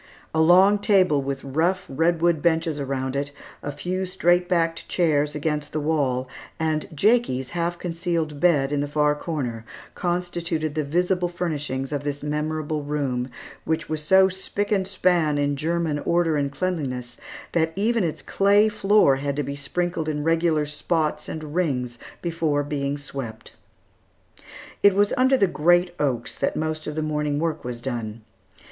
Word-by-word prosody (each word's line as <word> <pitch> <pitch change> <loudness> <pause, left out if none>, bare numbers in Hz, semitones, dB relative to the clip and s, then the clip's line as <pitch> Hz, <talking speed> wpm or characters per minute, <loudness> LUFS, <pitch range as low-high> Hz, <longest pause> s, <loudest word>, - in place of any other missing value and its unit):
A 160 - +3
long 190 +5 +6
table 185 -8 +3
with 135 0 -4
rough 170 +7 0
redwood 165 +2 +1
benches 160 -2 +1
around 130 -1 -2
it, 140 +1 -1 0.3
a 145 - -4
few 180 +6 -3
straight 175 -1 +2
backed 165 -2 0
chairs 150 -4 +1
against 150 -1 -2
the 155 - 0
wall, 140 -4 0 0.3
and 155 -1 0
Jakie's 155 - +2
half 175 0 -1
concealed 165 -3 -2
bed, 145 -5 +3
in 145 - 0
the 145 - -1
far 150 0 +2
corner, 135 -8 -4 0.3
constituted 175 -3 -2
the 155 0 -1
visible 180 +4 0
furnishings 145 -6 -3
of 145 -1 -2
this 145 0 -4
memorable 150 0 -2
room, 140 -4 -2 0.3
which 160 +1 -2
was 155 -1 -2
so 190 +5 +5
spick 190 +2 -3
and 195 -2 +2
span 180 -6 +2
in 145 0 +1
German 160 0 -1
order 170 0 +1
and 140 -1 0
cleanliness, 135 -8 -3 0.3
that 160 -1 +1
even 220 +2 +1
its 165 -3 -3
clay 205 +2 +4
floor 205 -9 +4
had 140 0 -2
to 145 - -1
be 140 +1 -4
sprinkled 160 +3 -2
in 150 -1 -2
regular 165 -1 +2
spots 150 0 -1
and 155 -2 -6
rings 125 -9 -1 0.2
before 165 -4 0
being 140 -1 -2
swept. 135 -6 -7 1.3
It 200 -1 +6
was 205 +1 +3
under 260 +1 +4
the 200 - +4
great 175 +1 +3
oaks 125 -5 -1
that - - 0
most 155 0 -3
of 150 - -4
the 155 - -1
morning 150 -1 -1
work 160 0 -2
was 120 -1 -5
done. 115 -4 -4
155 Hz, 160 wpm, -24 LUFS, 145-175 Hz, 1.3 s, long